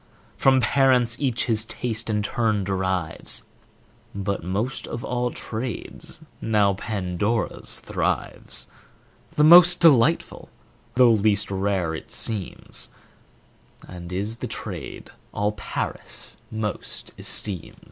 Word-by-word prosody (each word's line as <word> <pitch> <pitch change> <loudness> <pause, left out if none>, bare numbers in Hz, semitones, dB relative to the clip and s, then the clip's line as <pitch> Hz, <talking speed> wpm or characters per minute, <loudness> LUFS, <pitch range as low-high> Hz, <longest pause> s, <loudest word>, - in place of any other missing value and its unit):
From 130 -1 +4
parents 125 -1 +3
each 130 -5 0
his 110 -2 +3
taste 115 0 -2
and 105 -1 0
turn 110 -5 0
derives: 95 -3 -1 0.7
But 100 -2 -3
most 105 +9 -3
of 115 - -6
all 125 0 -1
trades 115 -1 -6 0.2
now 105 -3 +2
Pandora's 100 +2 -1
thrives; - - -1 0.7
The 150 - +3
most 175 +2 +9
delightful, 160 -1 +3 0.5
though 125 -2 +6
least 105 -2 +2
rare 95 -4 -1
it 80 - -8
seems, 105 -5 +1 1.0
And 90 -1 -9
is 100 +5 -3
the - - -5
trade - - -7 0.2
all 105 +1 0
Paris 105 - -6
most 110 -2 -4
esteems. 95 -6 0
110 Hz, 105 wpm, -24 LUFS, 100-120 Hz, 1.0 s, most